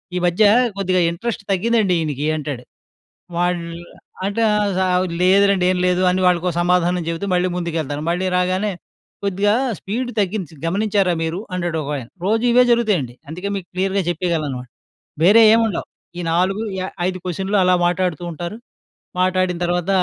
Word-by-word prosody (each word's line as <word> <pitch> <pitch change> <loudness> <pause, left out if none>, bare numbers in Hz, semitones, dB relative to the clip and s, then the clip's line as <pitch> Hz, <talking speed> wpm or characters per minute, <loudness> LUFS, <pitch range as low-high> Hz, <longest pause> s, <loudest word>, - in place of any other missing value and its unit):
"ఈ - - 0
మధ్య 175 +5 +2 0.3
కొద్దిగా 185 -2 +1
ఇంట్రెస్ట్ 205 +4 -4
తగ్గిందండి 205 0 +2
ఈయనకి" 150 -2 -2
అంటాడు. 145 -5 -5 0.7
వాడు 175 -1 0 0.6
అంటే, 205 +3 -1 0.8
"లేదులెండి, 195 0 +4
ఏం 185 - -1
లేదు" 180 0 +2
అని 185 +1 0
వాళ్ళకి 180 0 +2
సమాధానం 180 0 +2
చెబుతూ 165 +4 -3
మళ్ళీ 180 +1 +2
ముందుకెళ్తాను. 160 -4 -3
మళ్ళీ 180 +2 0
రాగానే, 185 +3 0 0.5
"కొద్దిగా 200 +2 +1 0.2
స్పీడ్ 245 +5 -3
తగ్గింది 190 -5 -3
గమనించారా 195 0 +1
మీరు?" 165 +3 -2
అంటాడు 175 -2 -2
ఒకాయన. 140 -4 -4 0.2
రోజు 225 +4 +1
ఇవే 250 +1 +6
జరుగుతాయండి. 210 - +1
అందుకే, 180 +6 -5
మీకు 185 - -6
క్లియర్‌గా 190 +1 0
చెప్పేయగలను 170 -2 -1
అన్నమాట. 125 -2 -6 0.6
వేరే 205 +6 +7
ఏం 225 - +5
ఉండవు. 200 - -4 0.3
ఈ - - -2
4,5 185 0 -1
క్వశ్చన్లు 190 +3 -1
అలా 180 0 +4
మాట్లాడుతూ 175 -2 -1
ఉంటారు. 175 +6 -6 0.6
మాట్లాడిన 185 -1 +1
తర్వాత 175 +1 -1
180 Hz, 140 wpm, -20 LUFS, 170-200 Hz, 0.8 s, వేరే